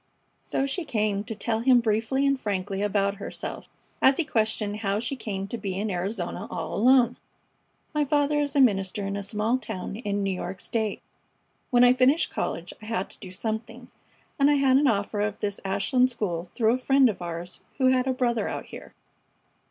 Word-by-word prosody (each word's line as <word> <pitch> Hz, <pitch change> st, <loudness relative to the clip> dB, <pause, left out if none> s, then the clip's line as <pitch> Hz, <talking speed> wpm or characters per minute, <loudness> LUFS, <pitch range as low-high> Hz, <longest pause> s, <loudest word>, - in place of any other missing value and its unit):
So 270 Hz, -, -1 dB
she 305 Hz, +6 st, -2 dB
came 210 Hz, -7 st, 0 dB
to 225 Hz, -1 st, -5 dB
tell 220 Hz, +2 st, -1 dB
him 250 Hz, +1 st, +5 dB
briefly 230 Hz, +4 st, +1 dB
and 275 Hz, -1 st, +2 dB
frankly 200 Hz, -2 st, -2 dB
about 200 Hz, -1 st, +1 dB
herself, 200 Hz, -, -6 dB, 0.3 s
as 265 Hz, 0 st, +5 dB
he 335 Hz, -, +2 dB
questioned 215 Hz, -5 st, 0 dB
how 200 Hz, -1 st, -1 dB
she 245 Hz, +4 st, -3 dB
came 195 Hz, -6 st, -4 dB
to 235 Hz, -, -4 dB
be 195 Hz, -2 st, -3 dB
in 210 Hz, +1 st, -1 dB
Arizona 180 Hz, 0 st, -3 dB
all -, -, -4 dB
alone. 245 Hz, +1 st, +4 dB, 0.8 s
"My 300 Hz, -1 st, +2 dB
father 290 Hz, +1 st, +2 dB
is 285 Hz, -1 st, -1 dB
a -, -, +4 dB
minister 195 Hz, -4 st, +2 dB
in 200 Hz, 0 st, -3 dB
a 200 Hz, -, -3 dB
small 210 Hz, +5 st, 0 dB
town 195 Hz, -3 st, -6 dB
in 205 Hz, -3 st, -2 dB
New 195 Hz, -1 st, 0 dB
York 185 Hz, 0 st, -5 dB
State. 220 Hz, -1 st, -2 dB, 0.7 s
When 245 Hz, -2 st, +5 dB
I 245 Hz, 0 st, +7 dB
finished 260 Hz, +5 st, +3 dB
college -, -, -3 dB
I -, -, -10 dB
had 225 Hz, -4 st, -2 dB
to -, -, -17 dB
do 185 Hz, -, -9 dB
something, 225 Hz, +5 st, -5 dB, 0.5 s
and 280 Hz, +1 st, +5 dB
I 295 Hz, -, +4 dB
had 270 Hz, -2 st, +4 dB
an 285 Hz, +1 st, +3 dB
offer 205 Hz, -2 st, 0 dB
of 210 Hz, 0 st, -2 dB
this 205 Hz, -1 st, -3 dB
Ashland 250 Hz, +6 st, +2 dB
school 180 Hz, -8 st, -3 dB
through 220 Hz, +5 st, +1 dB
a 255 Hz, -, -1 dB
friend 270 Hz, 0 st, +4 dB
of 210 Hz, -5 st, -3 dB
ours 175 Hz, +1 st, -6 dB, 0.2 s
who 260 Hz, -2 st, +4 dB
had 255 Hz, 0 st, +2 dB
a -, -, +2 dB
brother 240 Hz, -3 st, 0 dB
out -, -, -4 dB
here. -, -, -11 dB
220 Hz, 200 wpm, -26 LUFS, 200-255 Hz, 0.8 s, I